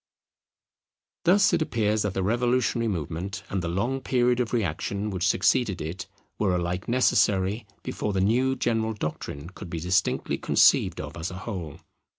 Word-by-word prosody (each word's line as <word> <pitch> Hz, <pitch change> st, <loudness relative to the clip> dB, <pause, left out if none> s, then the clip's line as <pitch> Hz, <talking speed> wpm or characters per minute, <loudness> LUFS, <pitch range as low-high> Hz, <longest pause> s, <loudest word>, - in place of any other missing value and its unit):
Thus 195 Hz, +2 st, +5 dB
it 170 Hz, -, +2 dB
appears 110 Hz, -7 st, +1 dB
that 105 Hz, -2 st, -2 dB
the 95 Hz, -, 0 dB
revolutionary 120 Hz, +2 st, +1 dB
movement, 95 Hz, +2 st, -4 dB
and 95 Hz, -, -1 dB
the 85 Hz, -, -3 dB
long 120 Hz, +10 st, -1 dB
period 125 Hz, -1 st, +2 dB
of 120 Hz, -2 st, -1 dB
reaction 100 Hz, 0 st, -2 dB
which 90 Hz, -2 st, 0 dB
succeeded 100 Hz, -7 st, +2 dB
it, 80 Hz, +5 st, -5 dB, 0.3 s
were 95 Hz, -4 st, +2 dB
alike 90 Hz, +1 st, -2 dB
necessary, 105 Hz, -4 st, +2 dB, 0.2 s
before 105 Hz, -, -3 dB
the 95 Hz, -, -1 dB
new 125 Hz, +7 st, +2 dB
general 115 Hz, -3 st, 0 dB
doctrine 75 Hz, -4 st, -5 dB
could 95 Hz, -1 st, -10 dB
be 85 Hz, -, -4 dB
distinctly 90 Hz, +3 st, 0 dB
conceived -, -, +4 dB
of -, -, -6 dB
as 85 Hz, +2 st, -3 dB
a 90 Hz, -, -8 dB
whole. 90 Hz, -10 st, -6 dB
105 Hz, 160 wpm, -26 LUFS, 90-120 Hz, 0.3 s, Thus